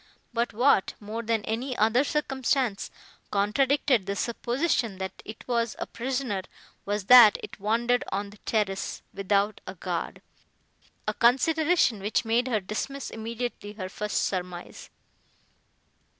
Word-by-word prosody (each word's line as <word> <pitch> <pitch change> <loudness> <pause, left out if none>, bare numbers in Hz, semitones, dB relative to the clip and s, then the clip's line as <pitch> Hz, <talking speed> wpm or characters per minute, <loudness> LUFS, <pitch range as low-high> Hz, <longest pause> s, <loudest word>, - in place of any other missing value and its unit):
But 235 +1 0
what, 245 -3 +3
more 215 +2 -5
than 225 -2 -1
any 245 +4 -3
other 225 +5 +4
circumstance, 265 -6 0 0.4
contradicted 240 +2 +2
the 200 - -1
supposition, 235 - -1
that 190 0 -6
it 215 - -10
was 235 -2 0
a - - -3
prisoner, 250 -5 -2 0.5
was 205 0 -1
that 235 -1 +9
it - - -9
wandered 235 +4 +1
on 200 +1 -3
the 210 - -15
terrace, 205 -3 -2
without 200 +2 0
a - - -6
guard: - - -4 0.8
a - - +1
consideration, 295 - +3
which 210 +4 0
made 235 +3 +2
her 230 -4 +1
dismiss 230 +8 -5
immediately 225 -1 -5
her 185 -3 -6
first 210 +2 -2
surmise. 180 -2 -5
225 Hz, 130 wpm, -27 LUFS, 205-250 Hz, 0.8 s, that